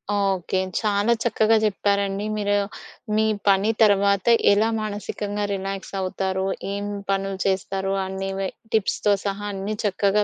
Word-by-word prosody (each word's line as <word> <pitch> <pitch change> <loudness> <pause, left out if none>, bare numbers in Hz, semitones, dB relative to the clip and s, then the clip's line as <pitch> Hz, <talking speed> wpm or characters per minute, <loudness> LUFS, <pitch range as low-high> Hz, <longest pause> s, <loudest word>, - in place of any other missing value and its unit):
Okay. 195 -2 0 0.2
చాలా 210 +1 +2
చక్కగా 225 -1 +3
చెప్పారండి. 200 -1 0
మీరు 205 0 +1 0.6
మీ 220 0 +3 0.2
పని 200 +2 +4
తర్వాత 200 -2 +3 0.3
ఎలా 215 +2 +3
మానసికంగా 205 0 -3
రిలాక్స్ 195 0 -5
అవుతారో, 190 0 -1 0.3
ఏం 200 0 -3 0.3
పనులు 195 0 -1
చేస్తారో 195 0 -1
అనేవి 195 0 -3 0.2
టిప్స్‌తో 210 -1 +2
సహా 200 +1 -2
అన్నీ 195 +2 -3
చక్కగా 205 +1 +2
200 Hz, 115 wpm, -23 LUFS, 195-205 Hz, 0.6 s, పని